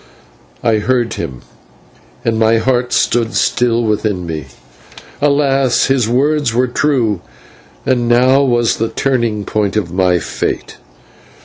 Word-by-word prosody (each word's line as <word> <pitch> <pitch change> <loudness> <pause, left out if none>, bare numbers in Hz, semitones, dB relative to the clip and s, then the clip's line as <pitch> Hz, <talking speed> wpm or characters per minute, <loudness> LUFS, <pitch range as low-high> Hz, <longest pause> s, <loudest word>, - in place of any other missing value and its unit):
I 115 -2 +2
heard 120 0 0
him, 65 -2 -6 0.8
and 115 -1 0
my 110 0 +3
heart 125 +1 0
stood 115 -1 +1
still 120 -1 +1
within 105 -4 -1
me. 80 -4 -5 0.7
Alas! 140 -3 +2
his 130 -4 +1
words 140 0 +1
were 125 +1 +3
true, 120 - 0 0.6
and 120 -2 +1
now 130 +3 +4
was 120 -4 +1
the 115 0 -1
turning 120 -6 -1
point 105 -2 -1
of 90 -5 -2
my 90 -1 +2
fate. - - -4
120 Hz, 125 wpm, -15 LUFS, 105-130 Hz, 0.8 s, now